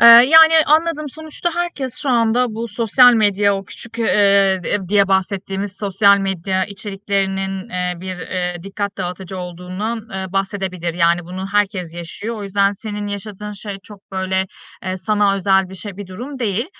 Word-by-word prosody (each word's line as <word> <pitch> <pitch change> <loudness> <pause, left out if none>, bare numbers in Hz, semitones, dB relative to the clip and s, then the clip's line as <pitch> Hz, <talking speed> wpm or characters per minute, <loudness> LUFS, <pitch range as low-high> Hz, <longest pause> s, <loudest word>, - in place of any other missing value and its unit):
Eee, 235 - +8
yani, 310 +8 +9
anladım. 310 0 +2
Sonuçta 315 +3 -4
herkes 340 -8 -3
şu 285 - -2
anda 235 0 +2
bu 230 +1 -4
sosyal 235 +3 +5
medya- 205 -3 +3
o 195 - -6
küçük, 230 +5 -9
eee, 200 -3 +3
eee, - - 0
diye 200 0 +3
bahsettiğimiz 195 0 -1
sosyal 200 0 +4
medya 190 -1 -1
içeriklerinin- 195 -1 -3
eee, 180 0 -2
bir, 185 0 -5
eee, 180 0 -3
dikkat 200 +1 -4
dağıtıcı 185 0 -5
olduğundan, 180 +6 -5
eee, 190 0 -3
bahsedebilir. 190 -3 -2
Yani 170 0 +2
bunu 185 +2 -6
herkes 195 -5 0
yaşıyor. 200 +7 -5
O 210 - -6
yüzden 200 0 +1
senin 210 0 -6
yaşadığın 205 +1 -6
şey 200 -1 -7
çok, 200 -2 -16
böyle, 190 0 0 0.4
eee, 185 0 -2
sana 205 0 +1
özel 195 0 +2
bir 190 - -10
şey, 195 0 -8
bir 205 -2 -7
durum 250 +9 -8
değil. 230 -1 -1
200 Hz, 165 wpm, -19 LUFS, 190-220 Hz, 0.4 s, yani